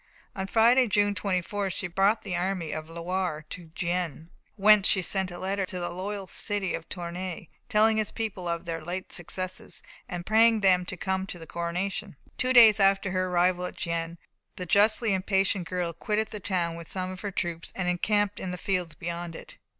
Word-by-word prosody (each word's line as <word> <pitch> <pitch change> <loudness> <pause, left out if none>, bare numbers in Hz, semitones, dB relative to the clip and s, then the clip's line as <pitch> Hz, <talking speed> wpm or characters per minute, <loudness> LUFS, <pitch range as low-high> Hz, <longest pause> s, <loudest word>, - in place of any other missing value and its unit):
On 190 -1 -3
Friday, 235 +4 +5
June 205 -1 +3
24th, 195 0 -1
she 195 - -3
brought 195 +5 +2
the 195 -3 -3
army 175 -3 -1
of 155 0 -5
the 165 - -12
Loire 175 -3 -2
to 180 -2 -7
Gien, 170 -2 -2 0.2
whence 210 -1 +6
she 190 - +3
sent 190 +1 0
a 175 - -8
letter 195 +2 -1
to 180 - -4
the 175 - -3
loyal 195 +2 -4
city 200 +1 -2
of - - -5
Tournay, 175 0 -5 0.2
telling 220 +1 +4
its 215 - -1
people 210 -5 -4
of 170 +1 -2
her 165 -1 -3
late 180 +3 -4
successes, 185 +1 -4 0.3
and 175 -1 -5
praying 225 0 +5
them 180 -2 +4
to 185 - -5
come 190 +1 -1
to 180 - -6
the 165 - -10
coronation. 180 +3 -3 0.2
Two 255 - +2
days 225 -4 +8
after 195 -1 +3
her 185 0 0
arrival 180 0 +2
at - - -10
Gien, 170 0 -3 0.4
the 180 - -5
justly 215 +3 +4
impatient 190 -1 +1
girl 175 -2 -2
quitted 210 +6 -1
the 210 - -5
town 180 -4 -1
with 170 -1 -9
some 185 -1 -2
of 185 - -8
her 205 - -3
troops 170 -3 -3
and 185 -2 -2
encamped 205 +3 +1
in 190 - -4
the 180 - -4
fields 180 -4 -1
beyond 170 +1 -5
it. - - -11
185 Hz, 195 wpm, -27 LUFS, 175-200 Hz, 0.4 s, days